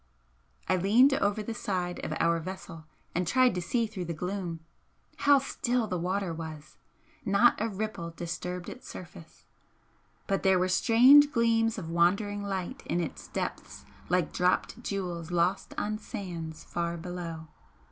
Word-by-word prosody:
I 185 - +3
leaned 230 +9 +5
over 205 -4 +1
the 230 - -4
side 180 -5 -3
of - - -3
our 170 0 +3
vessel 165 -2 -8 0.3
and 180 0 -1
tried 255 +5 +4
to 180 - -2
see 230 +7 0
through 205 -5 -5
the 170 -1 -4
gloom. 180 -1 -4 0.6
How 285 0 +5
still 250 -3 0
the 180 -4 -3
water 185 0 -1
was! 160 -2 -8 0.5
not 200 +3 +4
a 225 - 0
ripple 205 -4 -4
disturbed 175 +1 -5
its 255 - -9
surface. 170 -2 -11 0.8
But 195 -1 0
there 190 -1 +4
were 185 +1 +1
strange 255 +9 +7
gleams 230 -2 +2
of 165 -5 -5
wandering 200 +5 +2
light 190 -3 -4
in 175 - 0
its 170 - -5
depths 65 0 -5 0.2
like 180 0 +1
dropped 180 +6 +1
jewels 180 -6 -3
lost 175 +2 0
on 215 +1 -2
sands 175 -8 -6
far 170 0 -3
below. 165 -2 -6
185 Hz, 150 wpm, -29 LUFS, 170-215 Hz, 0.8 s, strange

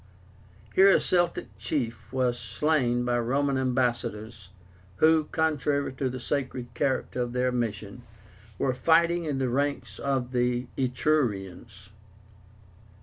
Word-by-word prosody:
Here 195 +1 +7
a - - +6
Celtic 175 -1 0
chief 120 -6 -3
was 125 -2 0
slain 125 -6 0
by 120 0 +1
Roman 135 +4 0
ambassadors, 120 -5 -2 0.5
who, 155 +5 +4
contrary 145 -3 0
to 130 0 -2
the 130 +1 -5
sacred 130 -2 -3
character 130 0 -1
of 120 0 -3
their 125 0 +1
mission, 115 -2 -3 0.6
were 130 - 0
fighting 170 +4 +3
in 145 -3 -2
the 130 -1 0
ranks 140 +3 -2
of 130 -3 -1
the 125 0 0
Etrurians. 115 - -1
130 Hz, 120 wpm, -27 LUFS, 120-145 Hz, 0.6 s, Here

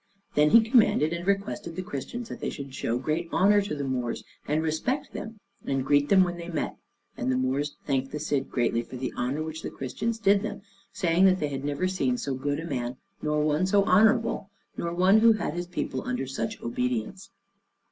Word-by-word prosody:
And 150 0 +4
he 225 -1 +7
commanded 215 - +4
and 170 +2 -5
requested 200 -3 -1
the 185 - -3
Christians 220 - -5
that - - -7
they - - -2
should 140 -2 -7
show 115 -1 -1
great 155 +6 -2
honor 205 +2 +4
to 195 -6 -3
the 145 - -3
Moors, 125 -3 -2 0.2
and 155 +2 +1
respect 250 - -1
them, 220 -1 -7 0.2
and 135 -1 -1
greet 145 +1 +3
them 190 -1 +6
when 175 -1 -2
they 170 0 -7
met: 170 - -2 0.4
and 125 +2 -1
the 130 - +1
Moors 135 +3 -1
thanked 135 -1 -1
the 150 - -3
Cid 145 -3 -1
greatly 120 -1 +1
for 120 - -10
the 130 0 -4
honor 135 +5 -1
which 160 0 -6
the - - -4
Christians 220 - -3
did 200 -2 +4
them, 205 -2 -5 0.3
saying 180 -1 +3
that 185 -1 +5
they 150 - -1
had 135 -1 -4
never 145 +5 -1
seen 135 -10 0
so 135 +2 -3
good 145 +3 -2
a 165 - -5
man, 125 -5 -3 0.2
nor 150 0 +1
one 155 +4 +2
so 200 +1 +4
honorable, 215 +4 +3 0.3
nor 170 - -3
one 185 +5 +5
who 230 0 +7
had 215 -8 -2
his 175 +1 -4
people 155 -7 -3
under 125 +1 -2
such 125 -3 -4
obedience. 125 - -2
155 Hz, 210 wpm, -27 LUFS, 135-190 Hz, 0.4 s, he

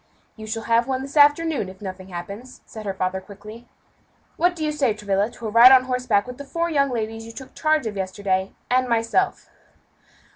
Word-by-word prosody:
"You 220 -1 -10
shall 225 +1 -4
have 230 +2 +2
one 265 0 -2
this 275 +2 -9
afternoon, 295 - +3
if 190 0 -13
nothing 190 -2 -8
happens," 200 +8 -9
said 215 -2 -9
her 195 - -1
father 190 0 -2
quickly. 210 +4 -12 0.7
"What 355 +1 +2
do 315 -2 -3
you 305 - 0
say, 275 -8 0
Travilla, 205 0 0
to 235 - -11
a 215 - -3
ride 235 +3 +9
on 260 -1 +7
horseback 250 -5 0
with 250 +1 -9
the - - -6
four 335 +4 -2
young 280 -2 +2
ladies 225 -2 -4
you - - -8
took 265 +3 -11
charge 310 -3 +1
of 215 -2 -4
yesterday, 190 0 -2 0.2
and 255 0 +2
myself?" 230 -1 0
230 Hz, 205 wpm, -23 LUFS, 205-265 Hz, 0.7 s, ride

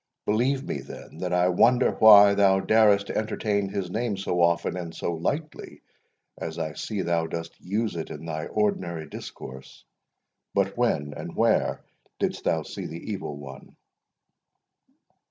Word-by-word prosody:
Believe 125 +6 +1
me, 70 - -3
then, 70 +3 -11
that 90 -1 -3
I 90 0 +3
wonder 120 +8 +4
why 105 -2 +8
thou 100 -1 +4
darest 105 -1 +4
to - - -6
entertain 105 -2 -1
his 95 -2 -4
name 110 -1 -1
so 90 -2 -1
often 85 +1 +2
and 85 -2 -6
so 85 - -2
lightly, 145 - -4 0.6
as 80 0 -5
I 80 -2 -3
see 105 +1 -4
thou 85 -1 0
dost 85 0 -5
use 105 +3 -2
it 80 - -5
in 75 +2 -8
thy 80 -1 -4
ordinary 90 -6 -1
discourse. 65 0 -10 0.7
But - - +1
when 75 0 0
and - - -7
where - - +1 0.3
didst - - -2
thou - - +1
see - - -6
the 85 +7 -7
Evil 85 -7 -5
One?" 70 -2 -11
90 Hz, 155 wpm, -26 LUFS, 80-105 Hz, 0.7 s, why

